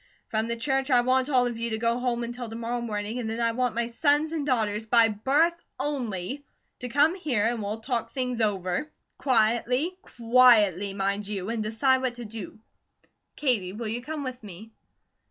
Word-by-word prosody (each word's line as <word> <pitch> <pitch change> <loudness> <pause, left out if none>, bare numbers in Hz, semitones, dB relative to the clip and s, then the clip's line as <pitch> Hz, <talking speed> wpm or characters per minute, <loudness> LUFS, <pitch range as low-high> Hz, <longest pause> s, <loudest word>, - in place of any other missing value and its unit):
From 220 +1 -1
the 235 - -1
church 270 +3 -1
I 250 -2 +5
want 255 +2 +1
all 255 -3 +4
of 240 -2 -3
you 235 0 -1
to 220 - -2
go 230 +2 0
home 245 -1 -1
until 240 0 -5
to 225 - -7
morrow 235 +1 -3
morning, 215 0 -3
and 225 -3 -3
then 225 +1 -3
I 230 -1 +2
want 245 -1 -1
my 235 0 0
sons 295 +5 +1
and 320 -3 -2
daughters 220 -4 0
by 230 0 +5
BIRTH 290 +11 +1 0.2
only, 255 -3 -3 0.4
to 250 - -5
come 290 +6 +4
here, 275 - -1
and 235 -1 0
we'll 210 +2 -4
talk 230 -1 -2
things 250 -3 -2
over, 195 +4 -1 0.3
quietly, 250 +6 +1
QUIETLY, 225 - +4
mind 200 +1 -1
you; 200 -1 -4
and 230 -1 -2
decide 240 +5 +2
what 255 -2 -1
to 240 -1 -7
do. 215 -1 -8 0.8
Katie, 220 -11 0
will 225 +2 -5
you 235 +3 -2
come 300 +2 -5
with 255 -1 -6
me?" 210 +2 -11
235 Hz, 190 wpm, -26 LUFS, 220-255 Hz, 0.8 s, I